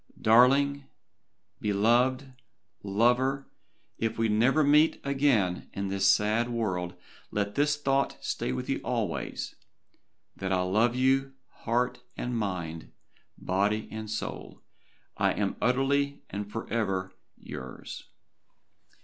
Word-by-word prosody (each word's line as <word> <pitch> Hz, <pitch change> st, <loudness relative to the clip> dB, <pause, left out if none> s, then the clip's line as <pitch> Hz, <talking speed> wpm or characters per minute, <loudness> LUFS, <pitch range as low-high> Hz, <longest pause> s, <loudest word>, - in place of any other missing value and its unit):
Darling 135 Hz, +5 st, +4 dB, 0.7 s
beloved 120 Hz, +6 st, +2 dB, 0.5 s
lover 125 Hz, +7 st, +1 dB, 0.5 s
if 115 Hz, 0 st, -1 dB
we 115 Hz, -1 st, +1 dB
never 120 Hz, +8 st, +3 dB
meet 150 Hz, +2 st, +4 dB
again 135 Hz, -10 st, +1 dB
in 100 Hz, 0 st, -3 dB
this 95 Hz, 0 st, +1 dB
sad 110 Hz, +4 st, +3 dB
world 90 Hz, -7 st, -2 dB, 0.3 s
let 100 Hz, -1 st, -2 dB
this 150 Hz, +3 st, +2 dB
thought 135 Hz, -1 st, +1 dB
stay -, -, -2 dB
with 65 Hz, -, -4 dB
you -, -, -1 dB
always, -, -, -3 dB, 0.8 s
that 95 Hz, 0 st, -4 dB
I 90 Hz, -1 st, +2 dB
love 110 Hz, +6 st, +2 dB
you 135 Hz, +1 st, +2 dB, 0.3 s
heart 125 Hz, +2 st, 0 dB, 0.2 s
and 120 Hz, 0 st, -3 dB
mind 90 Hz, -7 st, -4 dB, 0.5 s
body 100 Hz, +3 st, 0 dB
and 110 Hz, -1 st, -6 dB
soul 110 Hz, -, -5 dB, 0.5 s
I -, -, +2 dB
am -, -, -1 dB
utterly 140 Hz, +3 st, +1 dB
and 100 Hz, +1 st, -5 dB
forever 95 Hz, -5 st, -2 dB, 0.2 s
YOURS." 65 Hz, 0 st, -8 dB
115 Hz, 110 wpm, -28 LUFS, 100-135 Hz, 0.8 s, Darling